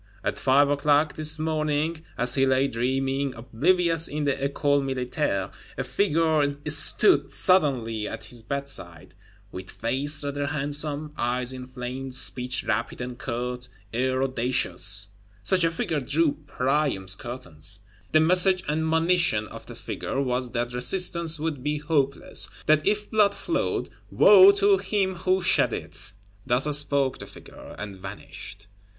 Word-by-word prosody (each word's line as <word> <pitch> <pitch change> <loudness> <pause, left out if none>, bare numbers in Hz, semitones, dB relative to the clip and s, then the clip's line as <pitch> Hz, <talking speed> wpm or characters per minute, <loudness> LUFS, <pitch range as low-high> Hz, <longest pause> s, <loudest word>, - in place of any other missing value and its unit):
At - - -2
five 140 +2 +4
o'clock 145 +1 +2
this 155 0 -2
morning, 155 0 -1
as 125 0 +1
he 135 -1 +2
lay 130 +1 +3
dreaming, 135 +2 -1
oblivious 165 +8 +2
in 150 +1 -3
the 140 -1 +1
École 140 +1 0
Militaire, 125 -6 -2 0.3
a 135 - -1
"figure" 155 +1 +1 0.2
stood 150 +8 +3
suddenly 125 - +2
at 115 0 -7
his 120 +1 -8
bedside; 110 - -5 0.4
"with 95 0 -8
face 140 +6 -1
rather 145 0 -3
handsome, 150 +1 -3
eyes 125 +1 -1
inflamed, 130 +1 -7
speech 125 0 -2
rapid 110 +2 -2
and 125 0 -6
curt, 125 0 -4 0.2
air 130 +2 0
audacious:" 115 -6 -1 0.4
such 185 - +2
a 165 - +4
figure 165 -2 -2
drew 145 +4 +2 0.2
Priam's 130 -10 0
curtains! 100 -5 -5 0.3
The 155 - +5
message 185 +3 +4
and 160 +1 -1
monition 160 -8 +2
of - - -11
the - - -9
figure 135 - -4
was 125 -2 -1
that 120 0 -2
resistance 165 +5 +3
would 155 -4 -3
be 150 +2 -1
hopeless; 145 -2 0 0.2
that 155 +2 +3
if 210 0 0
blood 210 -2 +3
flowed, 340 - -2 0.2
woe 195 -1 +8
to 200 0 +4
him 195 -1 0
who 185 +1 0
shed 180 - +3
it. - - -7 0.3
Thus 135 +4 +3
spoke 140 -2 +2
the - - -7
figure: - - -13
and 100 -2 -7
vanished. 100 +1 -9
140 Hz, 140 wpm, -25 LUFS, 125-155 Hz, 0.4 s, woe